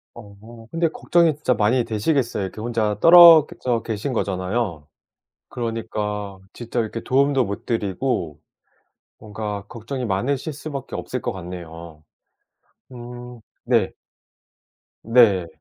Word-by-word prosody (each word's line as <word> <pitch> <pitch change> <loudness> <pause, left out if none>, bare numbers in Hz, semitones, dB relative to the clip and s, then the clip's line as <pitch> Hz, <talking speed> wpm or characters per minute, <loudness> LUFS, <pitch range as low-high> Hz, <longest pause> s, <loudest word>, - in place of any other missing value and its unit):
어 115 +1 -13
근데 165 0 +1
걱정이 170 -1 +2
진짜 145 -4 0
많이 120 +4 +2
되시겠어요. 115 0 -1
이렇게 95 +3 -6
혼자 110 -3 -1
떨어 170 -2 +9
그 - - -13
져 120 -3 -1
계신 110 +4 -3
거잖아요. 95 -6 -2 0.6
그러니까 105 -4 -4
진짜 120 0 -4
이렇게 115 0 -3
도움도 135 0 +2
못 100 0 -6
드리고 100 - -2 0.8
뭔가 105 -1 -6
걱정이 125 +3 -6
많으실 130 - -2
수밖에 140 -2 -7
없을 125 - -5
것 120 - -2
같네요. 85 -3 -9 0.9
음 120 0 -10 0.2
네. 115 -5 +1 1.1
네. 110 -7 +4
115 Hz, 255 characters per minute, -22 LUFS, 100-125 Hz, 1.1 s, 떨어